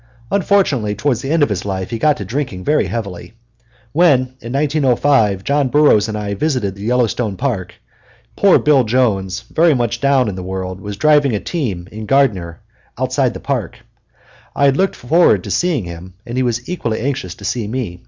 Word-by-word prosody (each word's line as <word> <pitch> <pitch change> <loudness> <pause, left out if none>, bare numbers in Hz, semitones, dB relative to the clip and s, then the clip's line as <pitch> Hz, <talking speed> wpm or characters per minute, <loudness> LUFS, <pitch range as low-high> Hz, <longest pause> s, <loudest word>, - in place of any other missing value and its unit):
Unfortunately, 180 - +1
toward 120 +4 0
the 135 - -5
end 160 0 +3
of - - +2
his 95 -3 -2
life 95 0 -4
he 115 - -3
got 150 +3 +3
to 100 - -6
drinking 115 -5 -4
very 150 +7 +1
heavily. 100 -4 -6 0.6
When, 135 -5 +3
in 115 - -7
1905, 135 -7 +2
John 140 +2 +1
Burroughs 130 -7 +4
and 110 -1 -4
I 105 -1 -3
visited 120 -4 -1
the 100 - -13
Yellowstone 115 -2 0
Park, 120 -10 -3 0.6
poor 200 -2 +5
Bill 145 -3 +3
Jones, 105 -5 0
very 160 +6 +2
much 120 -1 -1
down 140 -3 +3
in 105 - -2
the 95 - -6
world, 95 0 -5
was 100 0 -6
driving 145 -4 +3
a - - -1
team 100 - -4
in 110 0 -7
Gardiner 100 -11 +1 0.4
outside - - 0
the - - -6
park. - - -3 0.7
I 140 - +2
had 135 -1 +4
looked 190 +5 +1
forward 165 +8 +3
to - - -6
seeing 170 - 0
him, 85 +2 -9
and 120 - -6
he 130 - +1
was 120 -1 -2
equally 120 -11 -3
anxious 120 -9 -3
to 100 - -11
see 115 0 -2
me. 110 -7 -4
120 Hz, 190 wpm, -17 LUFS, 100-140 Hz, 0.7 s, poor